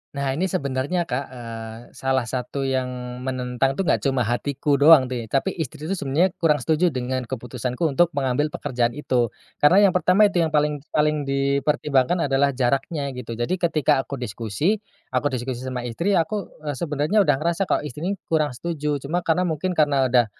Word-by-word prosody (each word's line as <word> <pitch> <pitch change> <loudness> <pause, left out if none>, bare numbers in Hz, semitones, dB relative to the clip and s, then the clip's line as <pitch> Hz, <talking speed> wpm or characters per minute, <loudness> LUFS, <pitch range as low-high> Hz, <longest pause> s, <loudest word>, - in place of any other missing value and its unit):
Nah 140 -1 -1
ini 180 +6 -1
sebenarnya, 140 +6 -1
Kak, 130 0 -2
eee, 115 -3 -8 0.2
salah 130 -2 0
satu 130 +3 -3
yang 125 -1 -3
menentang 130 +1 -1
tuh, 195 - 0
enggak - - +2
cuma 135 -3 +1
hatiku 140 +5 -1
doang 145 -1 +7
nih. 120 -3 -5
Tapi 140 +8 0
istri 155 -2 -5
tuh, 190 - -1
sebenarnya 170 +3 +1
kurang 155 -3 +2
setuju 160 +7 +2
dengan 130 -2 -2
keputusanku 125 +3 -3
untuk 160 +3 +3
mengambil 135 +3 +1
pekerjaan 125 -5 -1
itu. 125 -5 +1 0.3
Karena 185 +8 +6
yang 185 - +3
pertama 185 +3 +4
itu 195 -4 +2
yang 160 - +1
paling 150 -1 +1
paling 150 -2 +1
dipertimbangkan 140 +3 +1
adalah 140 0 +2
jaraknya 135 +3 0
gitu. 120 -2 -6
Jadi 120 +9 -1
ketika 155 -5 +2
aku 140 +1 -7
diskusi 120 - -1 0.3
aku 130 +3 +1
diskusi 125 -1 -4
sama 130 -1 -4
istri 170 - 0
ya 165 - +3
aku, 200 +3 -6
eee, 145 - -1
sebenarnya 150 +7 +1
udah 190 - +3
ngerasa 170 +5 -1
kalau - - +1
istri 150 +1 -7
nih 200 - -2
kurang 155 -2 +1
setuju. 150 +2 -3
Cuma 155 +6 -2
karena 175 +2 +1
mungkin 175 +2 -2
karena 140 -4 +3
udah 120 -1 +4
140 Hz, 180 wpm, -23 LUFS, 125-160 Hz, 0.3 s, doang